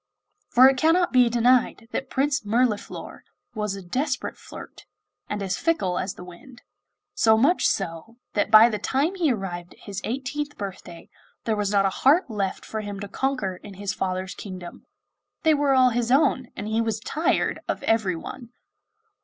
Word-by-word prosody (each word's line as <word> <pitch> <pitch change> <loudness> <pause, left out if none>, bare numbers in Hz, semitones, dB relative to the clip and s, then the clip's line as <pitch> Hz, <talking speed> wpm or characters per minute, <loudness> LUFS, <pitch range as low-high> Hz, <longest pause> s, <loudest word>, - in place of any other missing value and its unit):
For 255 +2 +7
it 270 -1 +3
cannot 330 +4 +3
be 250 -2 +5
denied 240 0 +2
that 265 - -4
Prince 275 -1 0
Mirliflor 220 0 -1 0.3
was 210 -3 -2
a 195 - -8
desperate 265 - -2
flirt, - - -12 0.4
and 205 -1 -3
as 190 -1 -2
fickle 195 - 0
as 185 0 -3
the - - -10
wind; 180 +8 -14 0.5
so 220 -1 +4
much 285 +11 +3
so, 190 +4 -3 0.2
that 205 - 0
by 215 +1 +9
the 215 -3 -2
time 285 +7 0
he 340 -7 +1
arrived 180 -5 -5
at - - -25
his 200 0 -6
eighteenth 275 +4 -4
birthday 185 -4 -8 0.4
there 225 - 0
was 205 -1 -1
not 200 -1 +3
a - - +3
heart 280 0 +4
left 195 -3 -3
for 220 - -4
him 205 -1 -6
to 205 - -6
conquer 210 -4 -2
in 200 +1 -12
his 200 0 -3
father's 185 0 -3
kingdom 185 -3 -9 0.6
they 320 -1 +5
were 285 -2 +2
all 255 -1 +5
his 240 0 -1
own, 260 -2 +3
and 205 - -5
he 220 +1 0
was 225 -1 -1
tired 310 +8 0
of - - -3
everyone! 220 +3 -1
225 Hz, 175 wpm, -24 LUFS, 195-265 Hz, 0.6 s, by